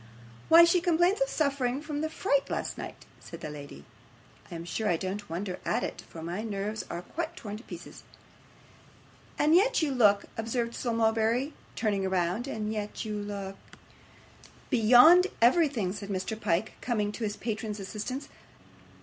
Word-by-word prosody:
'Why, 330 +1 +10
she 340 +1 +4
complains 350 +6 +2
of - - +2
suffering 275 -4 0
from 300 -1 -4
the 315 - -1
fright 280 -3 +1
of - - -17
last - - -3
night,' - - -8
said - - -11
the 155 -4 -5
lady. 140 - -10 0.7
'I - - -5
am 165 0 -6
sure 215 +4 -2
I 170 - +2
don't 195 +4 -5
wonder 180 +2 -4
at - - 0
it, - - -4
for 160 - -9
my 175 +5 -3
nerves 210 0 -3
are 170 +1 -5
quite 335 - -5
torn 210 - -6
to 225 - -13
pieces.' - - -10 1.4
'And 300 +2 +3
yet 395 +2 +4
you 295 - +1
look,' 210 -6 +4
observed 230 +1 -2
Sir 240 - -2
Mulberry, 230 +4 +1 0.2
turning 200 -4 0
round; 185 +6 0
'and 215 -4 -3
yet 210 +1 -4
you 215 -1 -3
look 200 -2 -5 0.6
' - - -24
'Beyond 255 - +7
everything,' 240 - +3
said 200 -1 -7
Mr. 190 +2 -2
Pyke, 195 0 -1
coming 210 -4 0
to 225 - -6
his 210 -1 -2
patron's 215 -2 -4
assistance. 215 +7 -5
220 Hz, 170 wpm, -29 LUFS, 200-275 Hz, 1.4 s, Why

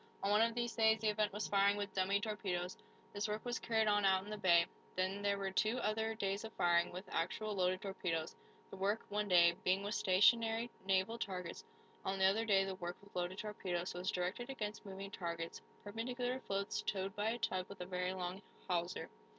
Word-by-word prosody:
On 200 - +2
one 210 +1 +5
of 230 0 +3
these 240 -1 -1
days 220 -1 +5
the 220 0 +2
event 210 0 +1
was 210 +2 -3
firing 200 0 +4
with 200 -1 -3
"dummy" 195 +1 +2
torpedoes. 190 -4 -2 0.4
This 205 +1 -1
work 215 +2 -3
was 245 0 -1
carried 220 -1 +1
on 205 -1 +3
out 190 -1 +4
in 210 - -9
the 215 - -3
bay. 170 -3 +6 0.3
Then 185 +2 0
there 200 0 +1
were 195 -1 -2
two 215 +5 +2
other 220 0 0
days 200 -1 -1
of 225 0 -7
firing, 175 -1 +3
with 185 +2 -7
actual, 210 +6 -1
loaded 185 -1 +1
torpedoes, 175 -5 -2 0.4
the - - -7
work, 200 +3 0
one 210 0 0
day, 170 -2 +6
being 185 +2 +2
with 205 +1 -2
stationery 225 +4 +4 0.2
naval 195 +4 +2
targets. 180 -5 -4 0.4
On 190 0 -1
the 190 - +4
other 210 +4 +3
day 195 -3 +4
the 195 - -3
work 175 -1 -5
with 200 0 -19
loaded 180 +1 -2
torpedoes 185 -4 -3
was 180 +2 -2
directed 185 +8 -2
against 215 -4 -4
moving 195 0 -6
targets 170 -3 -4 0.2
perpendicular 245 +4 -2
floats 195 -4 -2
towed 190 -1 -2
by 210 +1 0
a 235 - -1
tug 185 -5 -1
with 200 - -10
a 180 - -4
very 180 0 -1
long 180 +1 -4 0.3
hawser. 175 -1 -1
195 Hz, 205 wpm, -37 LUFS, 185-215 Hz, 0.4 s, bay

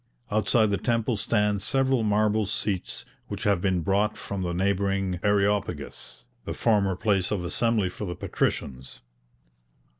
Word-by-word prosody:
Outside 110 +1 +3
the 100 - 0
temple 115 -1 0
stand 105 -1 +1
several 135 +2 +2
marble 105 0 +2
seats 100 -2 -2 0.2
which - - -5
have 100 -4 +2
been 95 -2 +1
brought 100 +5 +1
from 100 -1 -4
the 90 -1 -1
neighbouring 95 0 0
Areopagus, 100 -10 -1 0.2
the - - -5
former 100 -4 +2
place 95 -2 +1
of 100 -4 -1
assembly 105 +3 +1
for 100 +3 -5
the 90 -2 -4
patricians. 65 -6 -3
100 Hz, 140 wpm, -26 LUFS, 95-105 Hz, 0.2 s, Outside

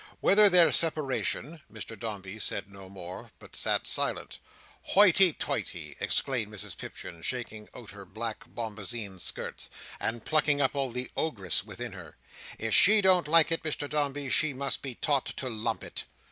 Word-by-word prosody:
Whether 205 +1 +6
their 175 -3 +6
separation—" 155 0 +1
Mr 110 +1 -8
Dombey 105 -2 -6
said 100 -1 -1
no 95 -1 -12
more, 90 -2 -9
but - - -12
sat - - 0
silent. - - -1 0.4
"Hoity 190 -2 +6
toity!" - - -4
exclaimed 120 -6 -1
Mrs 105 - -7
Pipchin, 85 -2 -9
shaking 110 -1 -5
out 115 -3 -10
her 100 0 -11
black 110 +4 -6
bombazeen 105 -3 -5
skirts, - - -5 0.3
and 115 0 -3
plucking 150 -2 +2
up 135 -2 +1
all 135 -2 -1
the 125 +1 -5
ogress 100 - -1
within 115 +3 -8
her. 90 -6 -12 0.4
"If 115 0 -2
she 210 +2 +8
don't 185 -4 +4
like 165 +1 +4
it, 165 - 0
Mr 150 -2 -3
Dombey, 145 -2 -2
she 155 -2 +3
must 135 +1 -3
be 135 -3 -7
taught 140 0 0
to 130 - -5
lump 110 -1 -3
it." - - -6
125 Hz, 160 wpm, -28 LUFS, 105-150 Hz, 0.4 s, she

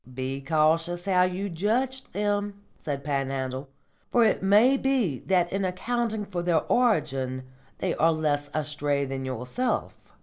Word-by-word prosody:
"Be 130 +2 -4
cautious 165 +4 +1
how 185 -2 +3
you 185 +2 -2
judge 235 +9 -1
them," 205 0 -2 0.2
said 140 -2 -4
Panhandle, 135 -1 -2 0.4
"for 240 - +4
it 215 - +2
may 210 +7 +5
be 260 - 0
that 180 -2 +2
in 195 0 0
accounting 220 +3 -1
for 185 -3 -4
their 170 -2 +2
origin 135 - +1 0.3
they - - -1
are 165 +2 +3
less 145 -2 0
astray 145 -2 -1
than 135 0 -4
yourself. 130 - -2
175 Hz, 140 wpm, -26 LUFS, 140-205 Hz, 0.4 s, may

